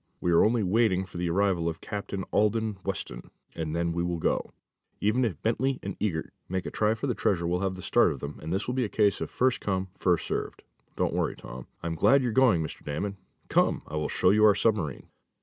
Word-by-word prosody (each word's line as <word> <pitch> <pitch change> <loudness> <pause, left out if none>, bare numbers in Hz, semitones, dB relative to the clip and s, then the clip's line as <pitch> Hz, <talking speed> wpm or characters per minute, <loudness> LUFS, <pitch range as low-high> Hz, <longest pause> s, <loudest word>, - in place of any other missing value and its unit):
"We 90 - 0
are 85 - +6
only 115 0 +2
waiting 95 -1 +2
for 90 -1 -10
the 85 0 -1
arrival 90 -2 +1
of 80 0 -6
Captain 100 -2 -5
Alden 110 -1 +1
Weston, 95 -2 -5 0.2
and 80 -1 -3
then 85 0 0
we 85 - -1
will 85 0 -1
go. 80 - -1 0.5
Even 110 +5 +2
if 100 -11 -1
Bentley 130 +4 +1
& - - -43 0.2
Eagert 85 -7 -2 0.2
make 95 0 -2
a - - -4
try 110 +1 +1
for 110 - -4
the 125 - 0
treasure 90 -6 0
we'll 90 +1 0
have 95 -1 -1
the 95 - -9
start - - +4
of - - -6
them, 70 +1 -7
and 80 - -5
this 95 +2 0
will 125 - -1
be 130 0 +1
a 110 - -2
case 105 -2 +2
of - - -3
first 130 -1 +1
come, 95 -1 -1
first 90 -3 +2
served. - - -4 0.3
Don't - - 0
worry, - - 0
Tom. 65 0 -10 0.2
I'm 85 -1 -2
glad 135 - +4
you're 120 - 0
going, 115 -9 +4
Mr 80 - -7
Damon. 100 +8 -3 0.3
Come, - - +2
I 75 - -6
will 75 -1 -1
show 90 - +3
you 105 +1 +4
our 105 -2 +7
submarine." 100 - 0
95 Hz, 235 wpm, -28 LUFS, 85-110 Hz, 0.5 s, our